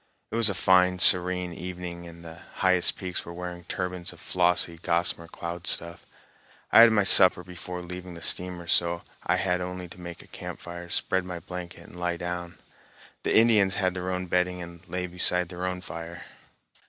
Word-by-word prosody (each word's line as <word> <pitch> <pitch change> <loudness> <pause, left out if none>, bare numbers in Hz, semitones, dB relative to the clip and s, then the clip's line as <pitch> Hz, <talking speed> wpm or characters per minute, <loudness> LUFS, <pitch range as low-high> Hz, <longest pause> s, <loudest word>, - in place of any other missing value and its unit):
It - - -4
was 115 -2 +4
a 100 - -2
fine, 90 -1 +3
serene 90 -1 +5
evening, 90 0 -7
and 85 0 -12
the 80 +1 -10 0.2
highest 90 -2 +2
peaks 90 -1 -4
were 85 - -10
wearing 90 -1 -7
turbans 90 0 -4
of - - -16
flossy, 90 -2 +1
gossamer 85 -1 0
cloud 85 +1 -7
stuff. 85 0 -4 0.6
I - - +8
had 115 0 +8
my 105 -2 +3
supper 90 -2 +7
before 90 0 -8
leaving 90 0 -8
the 85 - -10
steamer, 90 +2 +1
so 85 0 +1 0.2
I - - +1
had 90 -1 0
only 90 0 -6
to 90 +1 -13
make 85 -1 -9
a - - -20
campfire, 85 0 -9
spread 95 +1 +1
my 90 -1 -6
blanket, 85 -1 -9
and 90 - -13
lie 90 -1 -2
down. 85 0 -6 0.6
The - - +1
Indians 110 -4 +4
had 95 -3 +1
their 90 0 -4
own 90 0 -3
bedding 90 0 0
and 85 -1 -9
lay 90 +1 -3
beside 90 0 +1
their 90 +1 -4
own 90 0 -4
fire. 85 +1 -8
90 Hz, 185 wpm, -26 LUFS, 85-90 Hz, 0.6 s, I